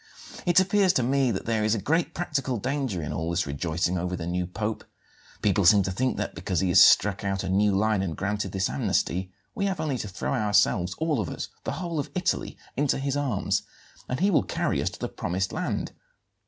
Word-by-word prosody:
It 175 0 +6
appears 190 0 +3
to 130 - +2
me 135 +1 +2
that 100 -5 -3
there 110 -2 0
is 110 +1 +2
a - - -2
great 160 - 0
practical 140 -7 -1
danger 125 - -2
in 75 - -4
all 80 +1 -2
this 85 0 0
rejoicing 85 +5 -1
over 90 +1 -2
the 85 -2 -5
new 90 +1 -1
Pope. 105 +4 -3 0.6
People 100 -1 +3
seem 100 +3 +6
to 95 - -2
think 125 +7 -1
that, - - -3
because 90 +1 -2
he 95 - +1
has 90 - +8
struck 100 -1 +4
out 95 -1 -1
a 95 - -3
new 100 +1 +3
line 110 -1 +2
and 85 -4 -3
granted 105 +2 -2
this 95 -1 0
amnesty, 90 +7 -1 0.2
we 200 - -1
have 190 -2 -2
only 140 -5 -1
to 105 - -4
throw 95 - -3
ourselves 105 -5 +2
all 160 -5 0
of 95 - -2
us, - - -5 0.2
the - - -2
whole 170 -4 -3
of 145 - -3
Italy 185 -1 -1 0.2
into 145 0 +1
his 135 0 -2
arms 135 -9 0 0.5
and 125 - -2
he 200 +2 +4
will 165 - +4
carry - - -1
us - - 0
to - - -11
the - - -2
promised 95 +2 -2
land. - - -2
105 Hz, 220 wpm, -26 LUFS, 90-135 Hz, 0.6 s, has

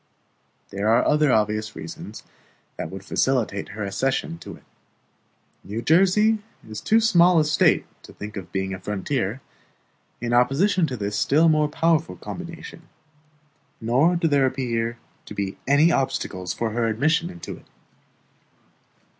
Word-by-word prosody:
There 100 +2 -2
are 115 +2 +4
other 150 -2 +3
obvious 110 0 0
reasons 80 +1 -8 0.5
that - - -5
would 95 0 -9
facilitate 115 -4 0
her 105 0 -5
accession 135 +11 -2
to - - -9
it. - - -19 1.0
New 105 +5 -5
Jersey 195 - +4 0.3
is 110 -1 -7
too 225 - +3
small 180 -6 +5
a 155 - +3
State 150 - +3 0.2
to - - -14
think 105 +1 -9
of 95 -4 -7
being 95 0 -2
a 95 - -6
frontier, 105 +4 -2 0.8
in 120 0 -2
opposition 160 +9 +3
to 130 -3 -5
this 105 -1 -3
still 160 +4 +4
more 155 -1 +2
powerful 165 +1 +1
combination; 170 -1 -9 0.9
nor 130 +10 +2
do 170 -1 +1
there 140 -3 +3
appear 120 -3 -2 0.3
to 105 - -9
be 100 -1 -4
any 145 +5 +5
obstacles 95 - -2
to 115 - -2
her 115 +1 0
admission 155 +10 +1
into 175 -2 -8
it. - - -20
130 Hz, 145 wpm, -23 LUFS, 105-165 Hz, 1.0 s, small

